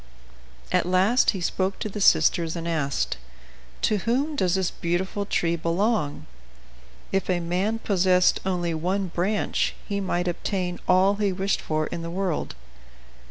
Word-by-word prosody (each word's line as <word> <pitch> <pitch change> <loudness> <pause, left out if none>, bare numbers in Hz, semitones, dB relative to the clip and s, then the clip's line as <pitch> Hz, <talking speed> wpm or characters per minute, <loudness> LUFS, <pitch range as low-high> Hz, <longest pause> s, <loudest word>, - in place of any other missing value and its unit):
At - - +2
last 190 +7 +3
he 190 - 0
spoke 190 +2 -1
to 220 - -4
the 210 0 -5
sisters, 165 -3 +4
and 170 0 -4
asked: 150 -5 -1 0.7
"To 215 - +3
whom 260 - 0
does 185 -9 +1
this 190 -2 0
beautiful 190 +4 -2
tree 170 -3 +1
belong? 170 -1 0 0.9
If 195 -1 -1
a 180 -1 +2
man 180 +6 -1
possessed 185 -4 +3
only 175 -3 -1
one 185 +4 -1
branch 190 +5 0
he 200 -1 -1
might 180 -2 -1
obtain 180 0 -2
all 190 +2 +4
he 205 -2 +1
wished 195 +1 -1
for 155 0 -1
in 170 - -5
the 165 - -5
world." 180 -1 -2
185 Hz, 150 wpm, -25 LUFS, 170-200 Hz, 0.9 s, sisters